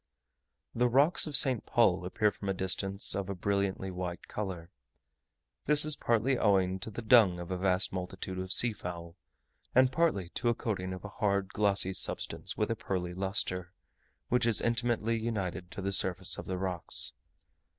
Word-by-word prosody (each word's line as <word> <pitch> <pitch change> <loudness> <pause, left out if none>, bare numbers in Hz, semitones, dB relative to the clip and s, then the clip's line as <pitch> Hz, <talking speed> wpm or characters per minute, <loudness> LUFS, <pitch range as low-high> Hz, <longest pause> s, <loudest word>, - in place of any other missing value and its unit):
The 120 +1 +1
rocks 145 +8 +4
of 150 - -1
St. 130 -3 +5
Paul 95 -6 +2
appear 105 +4 +1
from 100 - -7
a 95 - -1
distance 95 +1 0
of 100 0 -4
a 100 - -3
brilliantly 100 0 -2
white 90 -1 -6
colour. 90 -4 -6 1.0
This 150 +1 +6
is 155 -1 -1
partly 120 +2 0
owing 95 -3 +2
to 100 - -6
the 110 +2 -7
dung 110 -6 +5
of 85 +1 -7
a 90 - -2
vast 95 0 +1
multitude 95 0 -5
of 95 0 -5
seafowl, 90 -8 +2 0.6
and 130 0 +5
partly 130 - 0
to 120 - -1
a 120 - +1
coating 95 -6 -4
of 95 +2 -8
a - - -6
hard 100 -2 +1
glossy 100 -2 +1
substance - - -2
with 105 +1 -1
a - - 0
pearly 90 -4 -4
lustre, 90 -1 -3 0.6
which 125 -1 +2
is 115 - +4
intimately 115 -1 0
united 95 -6 -4
to 100 - -8
the 100 0 -2
surface 95 -2 +2
of - - -9
the 95 - -3
rocks. 90 -3 -2
100 Hz, 170 wpm, -30 LUFS, 95-115 Hz, 1.0 s, This